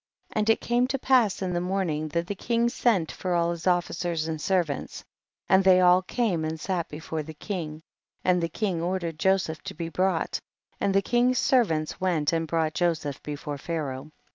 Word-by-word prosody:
16. - - -2
And 215 +1 +1
it 225 - +4
came 240 +1 +2
to 275 - -1
pass 245 -7 +3
in 180 -1 -2
the 175 - 0
morning 180 -5 -1
that 170 +3 -1
the 205 - -3
king 235 +4 0
sent 210 -9 +1
for 180 -1 -2
all 170 0 +2
his 170 +1 -5
officers 175 -2 0
and 160 -1 -3
servants, 175 -7 -1 0.4
and 190 0 +5
they 185 -1 +6
all 180 0 +6
came 190 -4 -1
and 160 0 -3
sat 175 0 -2
before 155 +1 -4
the 155 +1 -9
king, 160 -4 -5 0.4
and 180 -1 +3
the 165 - -1
king 185 -2 -2
ordered 170 -2 -2
Joseph 190 -5 +1
to - - -7
be 165 +1 -4
brought, 185 -1 0 0.4
and 195 -1 +1
the 195 - +4
king's 245 +1 +2
servants 165 - +1
went 170 -5 +1
and 165 0 0
brought 160 -1 0
Joseph 160 -6 -1
before 145 -1 -5
Pharaoh. 145 -3 -4
175 Hz, 190 wpm, -26 LUFS, 160-195 Hz, 0.4 s, they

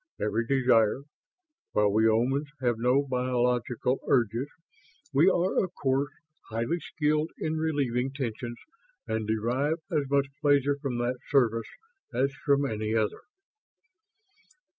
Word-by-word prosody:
Every 110 +2 -1
desire. 125 -2 +3 0.7
While 105 -1 +3
we 110 +1 +3
Omans 130 +6 +1
have 120 -3 0
no 125 +4 +3
biological 125 -1 0
urges, 120 +1 +2 0.7
we 155 +7 +6
are 185 +1 +2
of 185 -1 -6
course 135 +1 0 0.4
highly 115 +10 -1
skilled 155 0 0
in 160 0 -2
relieving 135 -5 0
tensions 120 -3 -4 0.5
and 110 -1 -2
derive 125 +8 0
as 145 -4 0
much 140 0 +3 0.2
pleasure 145 -1 +3
from 130 -4 -2
that 120 +1 -1
service 115 -5 +2 0.4
as 135 +3 0
from 140 0 +1
any 110 -2 -2
other." 110 -2 0
130 Hz, 120 wpm, -28 LUFS, 115-140 Hz, 0.7 s, we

